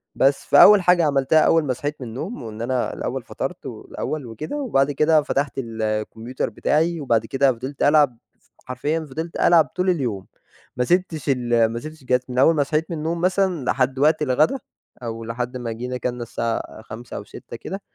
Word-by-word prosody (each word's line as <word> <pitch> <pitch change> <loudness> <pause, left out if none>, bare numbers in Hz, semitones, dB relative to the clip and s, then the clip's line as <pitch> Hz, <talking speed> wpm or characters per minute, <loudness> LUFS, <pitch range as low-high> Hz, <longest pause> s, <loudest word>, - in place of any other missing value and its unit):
بس 135 +1 +2
فأول 210 -2 +8
حاجة 175 -2 +4
عملتها 140 +2 +3
أول 165 +1 +4
ما 130 -3 -1
صحيت 145 +4 -4
من 125 - -5
النوم، 145 - -6
وإن 110 0 -7
أنا 125 +1 -1
الأول - - -4
فطرت، - - -6
والأول 155 -4 -5
وكده، 120 - -6
وبعد 145 - +1
كده 155 +2 +3
فتحت 140 -2 -1
الcomputer 110 +1 -3
بتاعي، 165 +2 0
وبعد 115 -4 +1
كده 135 +2 +2
فضلت 130 +4 -5
ألعب 145 -5 +4 0.2
ف - - -33 0.2
حرفيًا 145 +6 -2
فضلت 160 +5 -5
ألعب 170 -2 +5
طول 185 +1 +1
اليوم، 120 - -1 0.5
ما 125 - +2
سِبتش 170 -5 0
ال 120 -3 +2
ما 115 +1 -3
سِبتش 155 +2 -10
الجهاز 125 0 +2
من 125 - -5
أول 160 +5 +5
ما 145 - +3
صحيت 155 +4 -2
من 165 - -3
النوم 165 +2 -2
مثلًا 185 -6 +1
لحد 130 +1 0
وقت 155 +2 +3
الغدا، 150 - +2 0.5
أو 115 -1 -5
لحد 120 +2 -4
ما 120 -2 -4
جينا 125 +3 -4
كَلنا 125 -1 -3
الساعة 115 -1 -4
17:00 115 +2 -9
أو - - -6
18:00 120 - -10
كده 195 - -7
135 Hz, 185 wpm, -22 LUFS, 120-160 Hz, 0.5 s, فأول